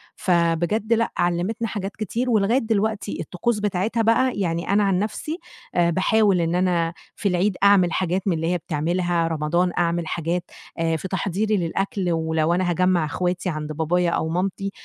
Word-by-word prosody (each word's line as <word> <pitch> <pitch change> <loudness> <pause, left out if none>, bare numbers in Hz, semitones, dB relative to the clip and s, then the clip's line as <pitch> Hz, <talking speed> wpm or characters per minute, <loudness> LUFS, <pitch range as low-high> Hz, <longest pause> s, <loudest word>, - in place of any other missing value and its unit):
فبجد 175 +5 +1
لأ، 230 0 +1
علِّمتنا 175 +7 0
حاجات 200 -1 -5
كتير 230 +4 -2
ولغاية 220 +1 +3
دلوقتي 220 -2 -1
الطقوس 215 +4 -1
بتاعتها 210 +3 0
بقى، 240 +4 +3
يعني 170 -3 -1
أنا 205 +1 +3
عن 195 -2 +2
نَفْسي 220 - -3 0.4
آآ 175 -1 +3
باحاول 195 +1 +3
إن 165 +1 0
أنا 175 -2 +1 0.2
في 205 - -2
العيد 185 +2 +1
أعمل 200 -3 +5
حاجات 185 +1 0
من 190 - +3
اللي 165 0 -2
هي - - +1
بتعملها، 170 +1 -1
رمضان 165 +3 0
أعمل 170 -1 0
حاجات 170 +2 -2 0.4
آآ 165 0 +1
في 160 - -4
تحضيري 200 +3 0
للأكل، 180 +1 -1
ولو 160 0 +1
أنا 180 0 +1
هاجمَّع 180 -1 +2
إخواتي 180 +4 -2
عند 155 -2 -4
بابايا 170 +3 +1
أو 160 - -1
مامتي 190 +3 -2
180 Hz, 165 wpm, -23 LUFS, 170-205 Hz, 0.4 s, أعمل